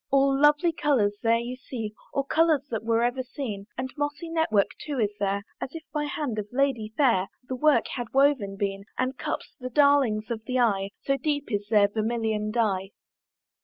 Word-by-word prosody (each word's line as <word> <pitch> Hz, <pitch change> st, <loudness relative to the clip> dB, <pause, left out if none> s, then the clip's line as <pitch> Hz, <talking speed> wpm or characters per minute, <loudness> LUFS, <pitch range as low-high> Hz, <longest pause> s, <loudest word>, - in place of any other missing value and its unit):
All 275 Hz, 0 st, +4 dB
lovely 295 Hz, +4 st, +4 dB
colours 250 Hz, -11 st, +2 dB
there 230 Hz, 0 st, +3 dB
you 240 Hz, +2 st, -4 dB
see, 235 Hz, -5 st, -6 dB, 0.2 s
All 275 Hz, -, 0 dB
colours 315 Hz, 0 st, +3 dB
that 225 Hz, -2 st, -2 dB
were 230 Hz, +1 st, +2 dB
ever 245 Hz, +2 st, 0 dB
seen, 235 Hz, -6 st, -6 dB
And 255 Hz, 0 st, -4 dB
mossy 295 Hz, +3 st, -3 dB
network 270 Hz, -12 st, +2 dB
too 290 Hz, -3 st, -4 dB
is 210 Hz, -3 st, +1 dB
there, 200 Hz, 0 st, 0 dB, 0.2 s
As 275 Hz, -, -5 dB
if 325 Hz, -, -6 dB
by 300 Hz, -1 st, 0 dB
hand 290 Hz, -7 st, -3 dB
of 210 Hz, -, -4 dB
lady 250 Hz, -5 st, 0 dB
fair 230 Hz, -10 st, +3 dB, 0.2 s
The 260 Hz, -, -3 dB
work 300 Hz, +3 st, +3 dB
had 240 Hz, -4 st, -5 dB
woven 265 Hz, -8 st, +2 dB
been, 195 Hz, 0 st, -2 dB
And 255 Hz, +1 st, 0 dB
cups, -, -, -4 dB
the 255 Hz, 0 st, -5 dB
darlings 255 Hz, -6 st, +3 dB
of 225 Hz, -2 st, -3 dB
the 255 Hz, 0 st, -1 dB
eye, 200 Hz, -5 st, +2 dB
So 275 Hz, 0 st, +1 dB
deep 290 Hz, -1 st, -2 dB
is 205 Hz, -1 st, -1 dB
their 210 Hz, -2 st, +5 dB
vermilion 220 Hz, 0 st, -1 dB
dye. 205 Hz, -4 st, 0 dB
245 Hz, 190 wpm, -26 LUFS, 215-280 Hz, 0.2 s, their